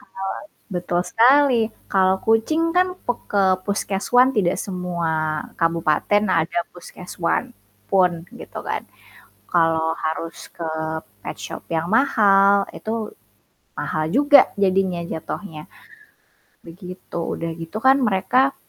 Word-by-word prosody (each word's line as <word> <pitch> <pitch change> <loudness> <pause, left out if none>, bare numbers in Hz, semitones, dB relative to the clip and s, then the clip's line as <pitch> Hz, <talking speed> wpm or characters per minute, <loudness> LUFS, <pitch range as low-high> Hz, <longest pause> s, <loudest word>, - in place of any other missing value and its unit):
Kalau 255 - -24 0.6
betul 175 0 -1
sekali, 255 +1 +5 0.3
kalau 190 -1 +3
kucing 225 +9 +2
kan, 365 +1 +4 0.2
pek 245 - -1
ke 200 -1 +3 0.2
puskeswan 205 +5 +2
tidak 180 -4 +2
semua 180 -3 -3 0.5
kabupaten 165 +4 +2 0.2
ada 170 +1 -3 0.2
puskeswan 180 +2 -3 0.5
pun, 185 -2 +4 0.3
gitu - - -8
kan. - - -2 0.7
Kalau 165 -1 +2
harus 160 +1 -3 0.2
ke 165 -2 -4 0.6
petshop - - -7
yang 160 0 0
mahal, 200 -5 +4
itu 220 -1 -4 0.7
mahal 155 - -2
juga 285 +1 +7 0.2
jadinya, 190 -2 +2
jatuhnya, 160 0 -6 1.1
begitu. 180 0 -8 0.2
Udah 165 0 -4
gitu 165 +6 -6
kan, 265 +1 +7
mereka 240 +8 +2
190 Hz, 105 wpm, -21 LUFS, 170-225 Hz, 1.1 s, juga